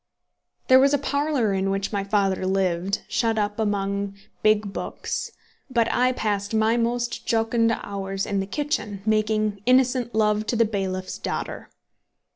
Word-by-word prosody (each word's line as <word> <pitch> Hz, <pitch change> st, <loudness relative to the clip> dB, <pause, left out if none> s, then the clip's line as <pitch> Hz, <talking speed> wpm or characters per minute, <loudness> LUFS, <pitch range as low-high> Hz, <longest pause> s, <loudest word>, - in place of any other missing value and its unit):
There 260 Hz, 0 st, +7 dB
was 275 Hz, +2 st, +4 dB
a -, -, +2 dB
parlour 280 Hz, -6 st, 0 dB
in 190 Hz, 0 st, 0 dB
which 195 Hz, +2 st, -2 dB
my 200 Hz, -1 st, 0 dB
father 195 Hz, -2 st, +1 dB
lived, 190 Hz, +1 st, 0 dB
shut 230 Hz, -2 st, 0 dB
up 210 Hz, +1 st, -1 dB
among 200 Hz, -1 st, -1 dB, 0.3 s
big 215 Hz, -2 st, +2 dB
books; -, -, -4 dB, 0.4 s
but 235 Hz, -3 st, +2 dB
I 255 Hz, +1 st, +3 dB
passed 205 Hz, -3 st, -2 dB
my 220 Hz, +1 st, +3 dB
most 240 Hz, +1 st, -1 dB
jocund 230 Hz, 0 st, +2 dB
hours 195 Hz, -2 st, -3 dB
in 200 Hz, -1 st, -1 dB
the 195 Hz, -, -2 dB
kitchen, 210 Hz, -7 st, -3 dB
making 215 Hz, -1 st, +1 dB
innocent 250 Hz, -2 st, +3 dB
love 215 Hz, 0 st, +2 dB
to -, -, 0 dB
the 230 Hz, 0 st, +4 dB
bailiff's 190 Hz, -3 st, -3 dB
daughter. -, -, -4 dB
215 Hz, 150 wpm, -24 LUFS, 200-235 Hz, 0.4 s, There